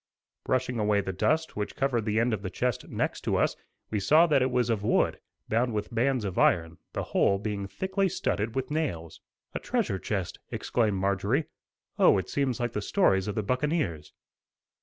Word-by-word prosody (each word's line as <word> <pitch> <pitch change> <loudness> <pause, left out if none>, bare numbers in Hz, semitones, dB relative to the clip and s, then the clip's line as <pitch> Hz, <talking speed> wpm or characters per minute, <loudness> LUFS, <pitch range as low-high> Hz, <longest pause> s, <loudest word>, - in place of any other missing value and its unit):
Brushing 125 -2 0
away 105 -1 +2
the 95 -1 -4
dust 160 - 0
which 105 0 -3
covered 125 -5 0
the 110 0 +1
end 115 0 +2
of 105 - -2
the 95 - -4
chest 125 +5 -2
next - - -2
to - - 0
us, - - +2 0.4
we 105 - 0
saw 155 - +5
that 145 -5 +3
it 130 - +2
was 125 -2 +1
of 110 -3 0
wood, - - +2 0.3
bound 115 +1 +1
with 105 +3 -3
bands 125 0 +1
of 95 -2 -2
iron, 85 -1 +2
the - - -2
whole 100 - +2
being 100 -1 -3
thickly 190 - -1
studded 115 - -2
with 130 +1 -2
nails. 110 - -3 0.3
"A - - -2
treasure 95 - -1
chest," 95 -4 -3
exclaimed 110 -5 0
Marjorie; 100 - +1 0.5
"oh, - - +6
it 95 -1 -3
seems 135 -4 0
like 120 -1 -1
the 105 - -2
stories 95 - +2
of 105 - -3
the 110 - -1
buccaneers." 125 - -1
110 Hz, 190 wpm, -28 LUFS, 100-130 Hz, 0.5 s, oh